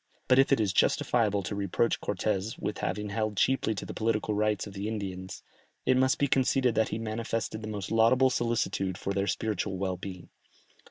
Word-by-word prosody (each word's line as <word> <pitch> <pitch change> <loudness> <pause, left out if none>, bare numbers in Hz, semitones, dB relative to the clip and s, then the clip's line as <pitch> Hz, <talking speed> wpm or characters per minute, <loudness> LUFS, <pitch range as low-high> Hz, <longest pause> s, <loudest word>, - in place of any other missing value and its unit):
But 130 0 +5
if 135 - +4
it 135 - +4
is 100 -4 +1
justifiable 105 -1 +2
to 105 - -4
reproach 100 +3 0
Cortès 100 +1 -2
with 105 - -4
having 105 0 -2
held 110 0 -2
cheaply 130 -3 +2
the 95 - -6
political 110 -1 0
rights 105 -1 0
of 100 - -9
the 100 +1 -4
Indians, 95 -3 -5 0.4
it 130 - +4
must 130 +3 +3
be 140 - +2
conceded 130 -2 +2
that 110 0 +1
he - - -2
manifested 115 0 -3
the 110 - -6
most 105 -3 -5
laudable 125 +4 +4
solicitude 110 -6 -1
for 100 - -3
their 100 +1 0
spiritual 100 +1 -1
well 95 -1 -2
being. 90 -1 -8
110 Hz, 185 wpm, -29 LUFS, 100-115 Hz, 0.4 s, But